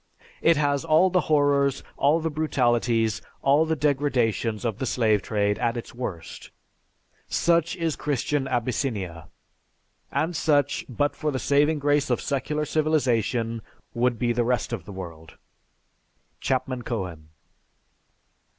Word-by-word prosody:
It 165 -2 +4
has 145 -1 +1
all 165 +3 +4
the 180 0 +3
horrors, 140 -2 +2
all 145 +4 +3
the 160 0 -2
brutalities, 120 -7 +1 0.2
all 145 +4 +4
the 160 - +1
degradations 125 -7 0
of 115 -1 -2
the 130 - -2
slave 110 -4 +2
trade 105 0 0
at 120 -1 0
its 120 - -7
worst. 100 -9 -6 0.8
Such 170 -1 +2
is 165 -3 -1
Christian 145 0 -1
Abyssinia, 115 - -2 0.8
and 165 +2 -1
such, 145 -3 +1
but 145 +4 0
for 155 - -2
the 135 - -1
saving 145 +4 +2
grace 145 0 +1
of 125 - +1
secular 150 +2 -2
civilization, 120 -7 0 0.3
would 120 0 +1
be 120 +1 +1
the 120 +1 +1
rest 120 0 -1
of 95 -7 -5
the - - -9
world." 85 -4 -9 1.0
(_Chapman 130 -1 -1
Cohen. 90 -10 -5
130 Hz, 130 wpm, -25 LUFS, 115-150 Hz, 1.0 s, It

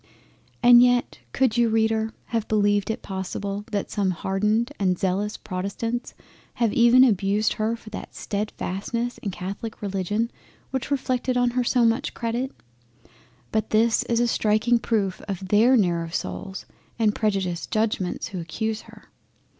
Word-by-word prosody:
And 240 0 +9
yet 245 0 +2
could 250 -3 +1
you 235 -1 +4
Reader 220 0 +1 0.2
have 225 -2 0
beleived 205 -1 +2
it 220 - -3
possible 195 +1 -4
that 205 -2 -2
some 200 -3 0
hardened 210 +7 0
and 185 -3 +1
zealous 195 +3 -1
Protestants 200 +6 -4 0.4
have 230 -3 +1
even 240 +2 +6
abused 210 -2 +2
her 220 +2 -1
for 225 -2 -13
that - - -8
steadfastness 215 +3 -3
in 205 - -4
the 185 - -7
Catholic 200 +5 -5
Religion 205 +3 -1 0.4
which 265 0 -3
reflected 255 -2 0
on 245 -1 +3
her 250 +1 +1
so 240 0 +3
much 230 +4 0
credit? 240 +3 -2 1.0
But 220 0 0
this 225 +1 +3
is 235 -1 +1
a 240 - +3
striking 225 +2 +2
proof 205 -5 -1
of 190 -2 -5
their 230 +6 +5
narrow 170 -5 +1
souls 190 +3 -5 0.3
and 220 -2 +2
prejudiced 195 -6 -1
Judgements 215 -4 -1
who 185 - -5
accuse 215 +7 -3
her. - - -16
215 Hz, 150 wpm, -24 LUFS, 195-235 Hz, 1.0 s, And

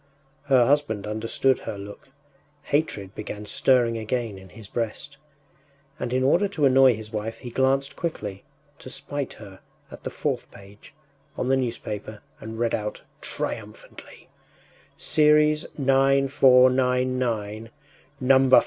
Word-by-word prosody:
” 135 - -37
Her 130 -4 +5
husband 135 -6 +1
understood 115 +5 0
her 100 - -6
look; 100 +6 -10 0.5
hatred 105 -10 -1
began 105 -1 -7
stirring 115 +1 +2
again 110 -2 -3
in 95 0 -14
his 110 0 -10
breast, 120 +6 -4 0.8
and 125 - -3
in 130 +1 +1
order 175 +9 +3
to 160 -7 0
annoy 130 -2 +6
his 110 0 -9
wife 110 +1 -4
he 120 - -9
glanced 135 +2 +1
quickly, 105 - -5 0.4
to - - -10
spite 140 +1 -4
her 100 -3 -12 0.3
at - - -11
the - - -3
fourth - - -3
page 100 +6 -16 0.4
on 125 - -1
the 135 - +4
newspaper 110 -4 -4 0.2
and 110 +1 -8
read 115 0 0
out 105 0 -3 0.2
triumphantly: - - -6 0.7
“Series 150 0 +3
9,499, 130 -4 +3 0.5
number 130 0 +5
46! - - +9
125 Hz, 130 wpm, -25 LUFS, 110-135 Hz, 0.8 s, 46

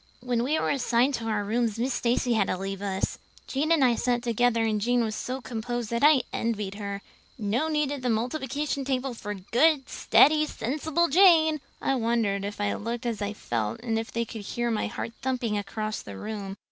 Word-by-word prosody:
"When 245 -1 0
we 285 +6 +1
were - - 0
assigned 255 0 +2
to 230 -3 -3
our 215 -2 0
rooms 225 +1 0
Miss 250 +3 0
Stacy 240 0 +1
had 215 -4 +2
to 185 - -1
leave 195 +1 -5
us. 195 -1 -2 0.3
Jane 295 +4 -1
and 310 -5 +5
I 245 - +4
sat 240 +1 0
together 235 -1 +2
and 215 -2 0
Jane 245 +2 +2
was 220 -1 -2
so 260 +3 -4
composed 240 -1 -4
that 235 - 0
I 295 -4 +6
envied 210 -4 -2
her. 200 -1 -5 0.3
No 230 +7 0
need 300 -2 0
of 285 -2 -4
the 250 - -1
multiplication 270 +5 -1
table 260 -1 -1
for 210 -2 -5
good, 265 - +2
steady, 305 +2 +4
sensible 310 +8 0
Jane! 320 -3 +5 0.2
I - - +2
wondered 225 -5 0
if 205 +1 -5
I 205 0 0
looked 230 +2 -4
as 230 -3 -2
I 205 +1 -2
felt 115 - -3
and 225 -2 -1
if 225 - -6
they 235 0 -1
could 225 -1 -7
hear 240 +4 -2
my 220 - 0
heart - - -5
thumping 250 -3 -1
clear 210 - 0
across 215 +1 -4
the 100 -1 -9
room. 200 - -5
235 Hz, 210 wpm, -27 LUFS, 210-265 Hz, 0.3 s, I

